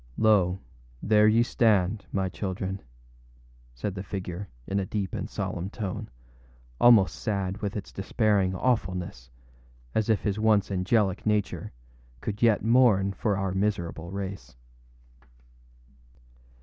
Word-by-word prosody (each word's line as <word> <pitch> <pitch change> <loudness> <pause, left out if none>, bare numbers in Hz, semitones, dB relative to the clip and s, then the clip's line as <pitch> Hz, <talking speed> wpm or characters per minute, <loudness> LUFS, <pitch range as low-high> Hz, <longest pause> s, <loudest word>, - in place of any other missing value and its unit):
âLo, 100 -5 +3 0.5
there 105 0 +5
ye 115 +2 +5
stand, 105 -4 +2
my 95 -1 0
children,â 95 0 -4 0.9
said 95 +11 -3
the 95 - -5
figure, 95 0 -6 0.2
in 100 - -1
a 95 - -1
deep 100 -2 -3
and - - -4
solemn 90 +2 -4
tone, 100 -4 -5 0.7
almost 115 -6 +6
sad 100 -3 -2
with 105 -1 -3
its 100 - -7
despairing 100 -2 +1
awfulness, 90 - -1 0.6
as 110 0 0
if 110 - +3
his 105 0 -1
once 110 -2 +3
angelic 95 +1 +1
nature 105 -1 -1 0.5
could 105 - -5
yet 115 -3 +3
mourn 110 -5 +4
for 100 -1 -1
our 95 -1 -1
miserable 90 -4 -2
race. 95 -5 -6
100 Hz, 125 wpm, -27 LUFS, 95-110 Hz, 0.9 s, almost